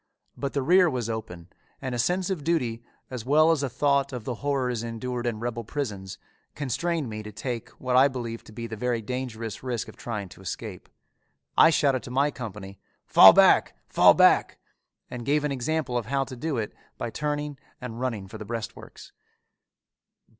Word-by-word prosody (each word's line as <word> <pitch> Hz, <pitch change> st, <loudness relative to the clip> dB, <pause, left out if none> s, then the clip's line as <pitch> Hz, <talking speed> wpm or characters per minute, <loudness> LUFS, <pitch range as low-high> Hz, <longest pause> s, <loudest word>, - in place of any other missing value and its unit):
But 140 Hz, -1 st, -4 dB
the 140 Hz, -, 0 dB
rear 180 Hz, +4 st, +5 dB
was 120 Hz, -5 st, -2 dB
open 90 Hz, -6 st, -7 dB, 0.3 s
and 130 Hz, -2 st, -4 dB
a 120 Hz, -, -2 dB
sense 180 Hz, +8 st, +1 dB
of 170 Hz, -6 st, -3 dB
duty, 125 Hz, -9 st, 0 dB, 0.3 s
as 125 Hz, -3 st, -5 dB
well 155 Hz, +5 st, +5 dB
as 160 Hz, -4 st, +1 dB
a 140 Hz, -, -1 dB
thought 140 Hz, +2 st, +1 dB
of 125 Hz, -4 st, -5 dB
the 125 Hz, -, -3 dB
horrors 130 Hz, -5 st, 0 dB
endured 120 Hz, +1 st, -4 dB
in 115 Hz, -3 st, -2 dB
rebel 120 Hz, 0 st, -3 dB
prisons, 100 Hz, -7 st, -5 dB, 0.4 s
constrained 145 Hz, +3 st, -1 dB
me 110 Hz, -1 st, -5 dB
to 105 Hz, 0 st, -9 dB
take 120 Hz, +2 st, -5 dB
what 125 Hz, -1 st, -1 dB
I 130 Hz, +2 st, +7 dB
believed 120 Hz, -4 st, -6 dB
to -, -, -12 dB
be 115 Hz, +2 st, -6 dB
the 110 Hz, -1 st, -6 dB
very 120 Hz, 0 st, -1 dB
dangerous 115 Hz, -2 st, -5 dB
risk 125 Hz, -3 st, -3 dB
of -, -, -11 dB
trying 105 Hz, -4 st, -5 dB
to 90 Hz, -, -14 dB
escape. 95 Hz, -, -7 dB, 0.7 s
I -, -, +7 dB
shouted 140 Hz, -5 st, +2 dB
to -, -, -9 dB
my 140 Hz, +4 st, +2 dB
company, 100 Hz, -6 st, -8 dB, 0.3 s
"Fall -, -, +9 dB
back! -, -, +5 dB
Fall -, -, +6 dB
back!" -, -, +4 dB, 0.5 s
and 125 Hz, -1 st, -5 dB
gave 145 Hz, +4 st, +1 dB
an 150 Hz, -, -1 dB
example 140 Hz, -1 st, -1 dB
of 110 Hz, -, -8 dB
how 135 Hz, +2 st, +1 dB
to 130 Hz, -1 st, -8 dB
do 145 Hz, +2 st, -3 dB
it 110 Hz, -2 st, -3 dB, 0.2 s
by 115 Hz, -, -4 dB
turning 145 Hz, -1 st, -3 dB, 0.2 s
and 120 Hz, -2 st, -7 dB
running 115 Hz, -7 st, -3 dB
for -, -, -10 dB
the 105 Hz, -, -7 dB
breastworks. 115 Hz, 0 st, -7 dB
125 Hz, 190 wpm, -26 LUFS, 115-140 Hz, 0.7 s, Fall